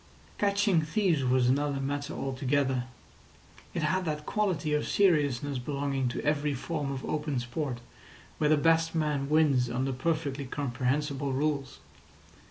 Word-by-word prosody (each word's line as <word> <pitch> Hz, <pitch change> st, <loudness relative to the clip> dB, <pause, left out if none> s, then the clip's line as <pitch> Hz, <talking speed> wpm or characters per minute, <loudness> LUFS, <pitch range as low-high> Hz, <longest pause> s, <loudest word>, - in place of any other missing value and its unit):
Catching 200 Hz, -3 st, +3 dB
thieves 165 Hz, -2 st, +1 dB
was 125 Hz, -1 st, +3 dB
another 140 Hz, +2 st, +1 dB
matter 145 Hz, +2 st, -3 dB
altogether. 130 Hz, -1 st, 0 dB, 0.9 s
It 165 Hz, -, -1 dB
had 185 Hz, +5 st, +1 dB
that 150 Hz, -2 st, -3 dB
quality 185 Hz, -8 st, 0 dB
of 150 Hz, -, 0 dB
seriousness 145 Hz, -8 st, +2 dB
belonging 140 Hz, 0 st, -1 dB
to 120 Hz, -, -3 dB
every 150 Hz, -1 st, +1 dB
form 145 Hz, +1 st, -3 dB
of 135 Hz, -1 st, -5 dB
open 150 Hz, -3 st, -1 dB
sport 125 Hz, 0 st, -4 dB, 0.6 s
where 150 Hz, -, +3 dB
the 155 Hz, -, +5 dB
best 165 Hz, +2 st, +3 dB
man 150 Hz, -3 st, 0 dB
wins 145 Hz, -6 st, +3 dB
under 130 Hz, +3 st, -1 dB
perfectly 140 Hz, 0 st, -1 dB
comprehensible 135 Hz, +1 st, -1 dB
rules. 140 Hz, -1 st, -1 dB
145 Hz, 135 wpm, -29 LUFS, 135-155 Hz, 0.9 s, the